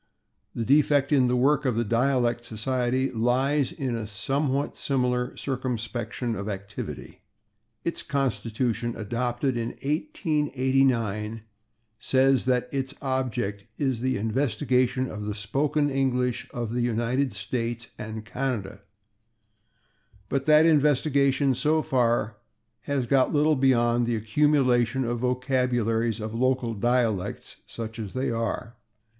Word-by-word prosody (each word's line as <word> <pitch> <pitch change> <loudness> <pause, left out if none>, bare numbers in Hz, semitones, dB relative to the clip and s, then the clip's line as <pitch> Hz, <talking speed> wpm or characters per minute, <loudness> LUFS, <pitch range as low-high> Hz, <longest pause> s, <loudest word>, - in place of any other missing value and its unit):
The 115 - -2
defect 145 +1 +3
in 135 -4 +4
the 125 - +1
work 145 +4 +3
of 130 -5 0
the 115 - +1
Dialect 120 +1 +1
Society 125 +3 -1
lies 130 +4 +1
in 130 -4 -3
a 110 -2 -4
somewhat 135 +7 -1
similar 125 -2 -1
circumscription 120 -2 -3
of 100 +1 -4
activity. 100 -2 -7 0.6
Its 170 - -2
constitution, 120 - -1
adopted 120 +4 -1
in 115 0 -3
1889, 135 - 0 0.6
says 135 +1 +3
that 125 -1 +1
"its 135 0 -3
object 125 -7 -2
is 130 -5 -1
the 130 -2 0
investigation 130 +2 +1
of 105 -3 -6
the 105 -1 -3
spoken 145 +8 0
English 125 -2 0
of 120 -2 -4
the 125 - 0
United 120 +3 0
States 115 +4 -4
and 110 0 -6
Canada," 110 -5 -3 1.5
but 135 -1 -1
that 155 +1 +6
investigation, 140 -3 +3
so 150 +5 +1
far, 120 -6 +1 0.5
has 140 -3 0
got 130 +1 +2
little 150 +1 +3
beyond 120 -3 +3
the 120 - +1
accumulation 125 +1 +2
of 120 0 -2
vocabularies 125 -3 0
of 110 0 -5
local 125 0 +1
dialects, 115 -3 -1
such 115 -1 -7
as 105 -4 -5
they 130 0 0
are. 115 +1 -3
125 Hz, 120 wpm, -26 LUFS, 115-135 Hz, 1.5 s, that